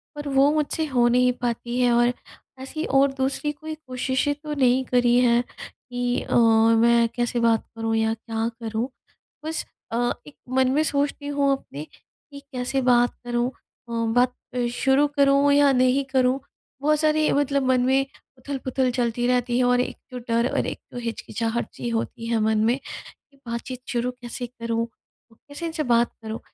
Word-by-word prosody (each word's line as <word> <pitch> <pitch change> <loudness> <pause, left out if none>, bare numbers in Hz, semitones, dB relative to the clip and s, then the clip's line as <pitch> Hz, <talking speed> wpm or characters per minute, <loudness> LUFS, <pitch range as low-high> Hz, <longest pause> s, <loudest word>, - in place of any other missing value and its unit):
पर 295 0 -6
वो 275 0 +4
मुझसे 310 +1 0
हो 245 -4 +3
नहीं 250 +1 +4
पाती 240 0 -2
है 245 -1 +3
और 240 +1 +3 0.5
ऐसी 310 +4 -5
और 275 0 +3
दूसरी 270 +2 -1
कोई 310 +2 -7
कोशिशें 260 -1 -1
तो 300 +1 -6
नहीं 260 -2 +3
करी 245 -1 +3
हैं 240 -1 +3 0.2
कि 245 0 -3
अ, - - -3
मैं 230 +1 +5
कैसे 240 0 0
बात 230 -1 +2
करूँ 225 0 -1
या 220 0 +1
क्या 225 0 -3
करूँ? 225 +2 -2 0.6
बस 315 0 -3 0.3
अ, 240 +1 +1 0.2
एक 295 - -13 0.2
मन 260 -1 +4
में 300 +3 +2
सोचती 285 -1 -1
हूँ 285 -1 +1
अपने, 145 - -9 0.5
कि 280 - -9
कैसे 255 +1 -1
बात 245 -1 +3
करूँ 240 0 0
अ, 245 -2 -19 0.2
बात 245 +1 +3 0.4
शुरू 270 +3 +3
करूँ 280 0 +4
या 285 -1 +5
नहीं 255 +1 +3
करूँ? 260 0 +3 0.4
बहुत 300 +1 +2
सारी 310 0 +2
मतलब 280 -1 +1
मन 255 -1 +3
में 265 +1 +3 0.3
उथल-पुथल 260 -1 -2
चलती 240 -1 -1
रहती 245 -1 +1
है 255 - +3
और 245 0 +3
एक - - -4
जो 250 - -5
डर 230 +1 +2
और - - 0
एक - - -5
तो - - -8
हिचकिचाहट 230 0 -3
सी 240 - -4
होती 230 0 -3
है 230 -1 +1
मन 220 0 +2
में, 240 +3 +2 0.5
कि 275 - -25
बातचीत 240 +2 -5
शुरू 245 +1 -1
कैसे 245 0 -6
करूँ? 230 -1 -3 0.5
कैसे 285 +8 -9
इनसे 320 -2 -2
बात 235 -2 +2
करूँ? 220 +1 -5
250 Hz, 170 wpm, -24 LUFS, 235-275 Hz, 0.6 s, मैं